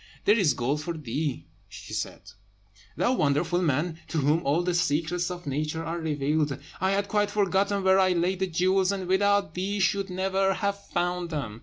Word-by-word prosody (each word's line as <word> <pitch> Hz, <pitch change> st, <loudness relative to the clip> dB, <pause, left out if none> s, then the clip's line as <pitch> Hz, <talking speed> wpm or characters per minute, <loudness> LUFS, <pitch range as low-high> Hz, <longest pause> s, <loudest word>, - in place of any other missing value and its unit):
"There 205 Hz, -, +6 dB
is 175 Hz, -, +3 dB
gold 135 Hz, +5 st, -1 dB
for 165 Hz, +1 st, -4 dB
thee," 140 Hz, -, -3 dB, 0.2 s
she -, -, -10 dB
said, -, -, -4 dB, 0.7 s
"thou 245 Hz, -, +2 dB
wonderful 160 Hz, -, +1 dB
man, 160 Hz, +1 st, 0 dB
to 165 Hz, -, -3 dB
whom 150 Hz, +3 st, +2 dB
all 155 Hz, +5 st, +1 dB
the 180 Hz, 0 st, 0 dB
secrets 170 Hz, +2 st, 0 dB
of 180 Hz, -1 st, -7 dB
Nature 150 Hz, +3 st, -2 dB
are 170 Hz, +1 st, -3 dB
revealed! 150 Hz, -2 st, 0 dB, 0.2 s
I 190 Hz, -, +1 dB
had 200 Hz, +1 st, 0 dB
quite 205 Hz, 0 st, +1 dB
forgotten 200 Hz, 0 st, +1 dB
where 190 Hz, 0 st, +5 dB
I 185 Hz, -1 st, +4 dB
laid 180 Hz, +2 st, 0 dB
the 190 Hz, -, 0 dB
jewels, 185 Hz, +2 st, +2 dB
and 195 Hz, -2 st, -3 dB
without 200 Hz, -2 st, +2 dB
thee 195 Hz, +3 st, -2 dB
should 195 Hz, +1 st, +1 dB
never 190 Hz, +1 st, +1 dB
have 200 Hz, -1 st, -2 dB
found 175 Hz, 0 st, -1 dB
them. 120 Hz, -9 st, -4 dB
175 Hz, 185 wpm, -27 LUFS, 155-190 Hz, 0.7 s, There